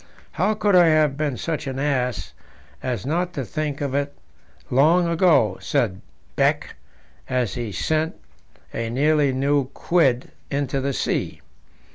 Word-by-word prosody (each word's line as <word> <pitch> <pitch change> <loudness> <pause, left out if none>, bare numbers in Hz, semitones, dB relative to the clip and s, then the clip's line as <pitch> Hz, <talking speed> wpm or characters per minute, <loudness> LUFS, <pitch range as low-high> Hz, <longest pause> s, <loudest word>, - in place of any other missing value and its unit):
"How 200 +6 +1
could 205 -2 +2
I 175 -2 +7
have 155 -3 +3
been 145 -3 -2
such 155 0 -3
an 135 -1 -4
ass 130 -4 -1 0.5
as 125 -6 -3
not 175 +5 -1
to 135 - -3
think 150 +1 -3
of 140 -2 -2
it 140 0 -1 0.6
long 165 +7 +4
ago?" 160 - +3
said 100 -2 0 0.3
Beck, - - +1 0.5
as 125 -4 0
he 120 -4 -4
sent 160 +9 -1 0.6
a 115 0 -2
nearly 145 +3 +2
new 140 +1 +1
quid 135 -2 +1 0.2
into 140 -1 -1
the 140 +1 -1
sea. - - -2
140 Hz, 140 wpm, -23 LUFS, 130-155 Hz, 0.6 s, I